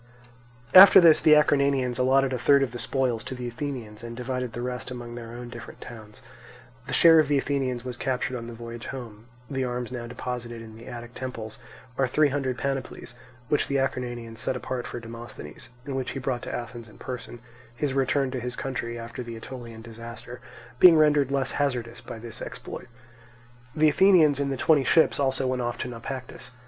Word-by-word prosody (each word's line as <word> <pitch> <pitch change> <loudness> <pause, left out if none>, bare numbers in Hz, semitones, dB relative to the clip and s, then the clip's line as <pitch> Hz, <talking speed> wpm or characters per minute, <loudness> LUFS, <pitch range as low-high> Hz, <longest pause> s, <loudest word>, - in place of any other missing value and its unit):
After 190 +1 +11
this 165 -3 +7
the 155 -1 +7
Acarnanians 140 -4 +2
allotted 135 +1 +3
a 125 - -2
third 140 +3 +5
of 135 - -2
the 120 - -7
spoils 125 -4 0
to 130 - -5
the 125 -1 -5
Athenians, 120 -4 -6
and 115 0 -7
divided 125 -1 -3
the 120 - -5
rest 125 0 -4
among 120 -1 -7
their 115 -1 -8
own 120 0 -7
different 120 0 -10
towns. 110 -2 -11 0.6
The - - -4
share 165 -1 +7
of 155 - +3
the 145 0 +2
Athenians 130 -3 -1
was 125 -2 -5
captured 130 -1 -2
on 115 -1 -6
the 120 - -8
voyage 115 0 -8
home; 115 -4 -8 0.2
the 135 -2 -2
arms 125 0 -3
now 120 -2 -5
deposited 120 -1 -5
in 110 -1 -11
the 115 +1 -12
Attic 120 -1 -8
temples 115 -5 -6 0.4
are 130 - +3
three 150 +3 +3
hundred 130 -2 -2
panoplies, 135 -3 -4 0.3
which 150 - +1
the 140 - 0
Acarnanians 120 -4 -3
set 130 - -1
apart 125 -1 -4
for 120 - -6
Demosthenes, 115 - -9 0.2
and 140 - -4
which 130 -1 -3
he 135 - -4
brought 130 -2 -2
to - - -6
Athens 120 -1 -6
in - - -17
person, 125 -1 -7 0.4
his 140 +1 -1
return 135 0 +1
to 130 - -3
his 125 +1 -4
country 120 -3 -4
after 115 +2 -7
the 115 -1 -7
Aetolian 115 -1 -9
disaster 115 +1 -9 0.4
being 175 -3 +9
rendered 150 -3 +4
less 135 -2 0
hazardous 125 -5 -2
by - - -8
this 115 0 -8
exploit. - - -7 0.9
The 155 0 +5
Athenians 155 -4 +5
in 140 -1 0
the 135 - -2
twenty 150 +1 +4
ships 160 +5 +3
also 135 -1 +1
went 130 -1 0
off 120 0 -2
to - - -4
Naupactus. 125 +1 -7
125 Hz, 195 wpm, -26 LUFS, 120-135 Hz, 0.9 s, After